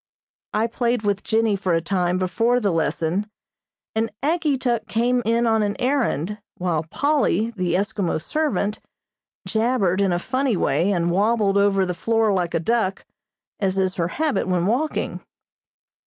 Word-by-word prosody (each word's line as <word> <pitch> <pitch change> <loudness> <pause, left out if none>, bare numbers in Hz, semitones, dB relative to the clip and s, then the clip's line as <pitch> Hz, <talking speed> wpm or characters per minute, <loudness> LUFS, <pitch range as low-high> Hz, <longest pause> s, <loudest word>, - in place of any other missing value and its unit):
I 215 +1 +1
played 235 0 -1
with 205 -1 0
Jennie 220 -2 +1
for 185 -3 0
a - - +3
time 180 +1 0
before 225 +7 +1
the 205 -5 +1
lesson, 165 +4 -1 0.6
and 225 +1 0
Ageetuk 270 -8 0
came 245 +2 +1
in 230 +1 +2
on 225 -1 +3
an 205 -1 0
errand, 225 - -1 0.2
while 170 -4 -1
Polly, 280 - +1
the 180 -6 -1
Eskimo 200 -3 -1
servant, 210 - -1 0.7
jabbered 220 -5 +1
in 195 -2 +2
a 175 - +1
funny 255 +3 0
way 185 +3 +1
and 175 -2 +1
wabbled 200 +1 +2
over 195 -1 +3
the 180 - -2
floor 225 +3 +1
like 180 -3 -1
a - - +2
duck, 195 +2 0 0.5
as 195 -2 0
is 190 -1 +1
her 170 -2 -1
habit 305 - -1
when 180 -2 +1
walking. 260 +10 -1
205 Hz, 155 wpm, -22 LUFS, 185-235 Hz, 0.7 s, a